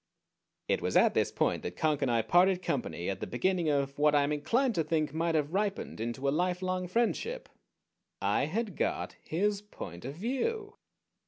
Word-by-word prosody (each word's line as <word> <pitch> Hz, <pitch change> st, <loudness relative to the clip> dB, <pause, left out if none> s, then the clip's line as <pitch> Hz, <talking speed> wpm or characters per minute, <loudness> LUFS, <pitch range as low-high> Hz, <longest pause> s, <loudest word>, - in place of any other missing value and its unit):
It -, -, +1 dB
was -, -, +1 dB
at -, -, +5 dB
this -, -, +1 dB
point -, -, 0 dB
that 90 Hz, -, -5 dB
Conk 155 Hz, -2 st, +1 dB
and 135 Hz, -, +1 dB
I 115 Hz, -2 st, +2 dB
parted 180 Hz, -, +4 dB
company 85 Hz, -, -2 dB
at 100 Hz, -, -2 dB
the -, -, -4 dB
beginning 175 Hz, +5 st, +1 dB
of 140 Hz, -1 st, 0 dB
what 150 Hz, 0 st, +4 dB
I 145 Hz, -, +5 dB
am 140 Hz, -, 0 dB
inclined 235 Hz, -, +1 dB
to 165 Hz, -, +1 dB
think 155 Hz, -2 st, 0 dB
might 165 Hz, +1 st, 0 dB
have 150 Hz, +1 st, 0 dB
ripened 200 Hz, -, -1 dB
into 120 Hz, +4 st, -2 dB
a -, -, +3 dB
lifelong 180 Hz, +2 st, 0 dB
friendship. 240 Hz, -, -1 dB, 0.7 s
_I 140 Hz, -, +1 dB
had 205 Hz, +2 st, -2 dB
got -, -, -1 dB
his 200 Hz, +5 st, 0 dB
point 90 Hz, -, -9 dB
of 135 Hz, +3 st, -5 dB
view! 410 Hz, -, -2 dB
165 Hz, 185 wpm, -30 LUFS, 140-200 Hz, 0.7 s, at